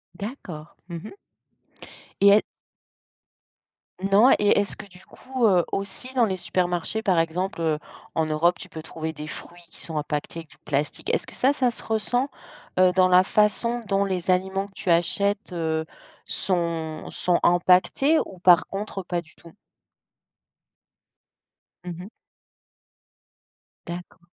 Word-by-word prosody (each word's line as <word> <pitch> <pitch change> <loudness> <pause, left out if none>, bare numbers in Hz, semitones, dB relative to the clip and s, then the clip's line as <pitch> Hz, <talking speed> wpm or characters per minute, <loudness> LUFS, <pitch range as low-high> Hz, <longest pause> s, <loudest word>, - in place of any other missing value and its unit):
D'accord, 180 - -8
mmh 170 - -5
mh. 165 - -9 1.1
Et 200 - +8
est 205 +1 +6 1.6
Non, 200 +6 +5
et 205 0 +4
est-ce 205 - -2
que - - -9
du 180 -1 -17
coup, 255 -3 -1
heu, 180 -4 +4
aussi 200 +7 -4
dans 245 -3 +4
les 190 -3 -2
supermarchés, 180 +4 -1
par 195 -6 +2
exemple, 170 +2 -1
heu, 155 -2 +1 0.3
en 160 -1 0
Europe. 160 +3 +2
Tu - - -9
peux 160 - -8
trouver 160 0 -5
des 150 -1 -8
fruits 175 +3 -9
qui - - -12
sont 160 - -7
empaquetés 150 +2 -3
avec 165 -2 -11
du - - -18
plastique. 145 0 -3
Est-ce - - 0
que - - -13
ça, 265 +2 +3
ça 255 -4 +1
se - - -6
ressent, 245 +5 0 0.5
heu, 185 0 +6
dans 185 0 +5
la 180 0 +6
façon 215 +4 +1
dont 200 0 +2
les 185 -2 -3
aliments 190 +2 +1
que 195 - -24
tu 195 - -5
achètes, 200 +4 +1
heu, 160 -2 -1 0.4
sont 165 -4 -2
sont 175 -1 +1
empaquetés 185 - +4
ou 190 - -12
par 175 -1 +5
contre, 200 0 -5
pas 175 -1 -3
du 160 -1 -21
tout? 165 -1 -16 2.3
Mmh 180 - -6
mh. - - -9 1.8
D'accord. 175 +2 -8
180 Hz, 150 wpm, -25 LUFS, 170-205 Hz, 2.3 s, Et